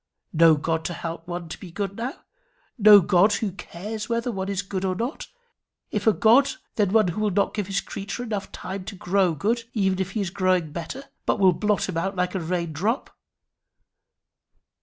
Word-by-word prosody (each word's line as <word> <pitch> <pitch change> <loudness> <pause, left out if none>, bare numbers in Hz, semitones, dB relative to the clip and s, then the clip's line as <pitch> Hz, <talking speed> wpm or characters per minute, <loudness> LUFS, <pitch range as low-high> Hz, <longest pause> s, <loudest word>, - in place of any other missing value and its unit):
No 165 0 +6
God 160 +2 -1
to 175 - -2
help 165 0 -6
one 175 -1 -5
to - - -8
be 185 - -9
good 195 +2 -4
now! 240 +5 -5 0.5
no 210 -1 +9
God 185 +4 +4
who 205 -1 -1
cares 210 +5 -7
whether 235 +1 0
one 190 -2 -3
is 200 0 -1
good 190 -1 -4
or 185 -1 0
not! 235 - -4 0.6
if 210 +1 -2
a - - +8
God, 255 +6 +4 0.2
then 205 -4 +2
one 215 -3 +4
who 180 +5 -3
will 210 - +2
not 200 +1 +1
give 205 -3 -2
his 200 0 -1
creature 200 +5 -6
time 225 - -8 0.5
enough 185 - -10
to 215 - -6
grow 185 -2 +1
good, 230 - -1
even 190 -3 +1
if 190 0 -2
he 220 - -1
is 185 -3 -3
growing 185 -4 +1
better, 170 - -6 0.2
but - - +2
will 190 -2 +6
blot 210 +3 0
him 185 -3 -3
out 195 +4 -1
like 180 0 -1
a 190 - -1
rain 170 -1 -2
drop! 215 - -2
195 Hz, 200 wpm, -24 LUFS, 175-215 Hz, 0.6 s, no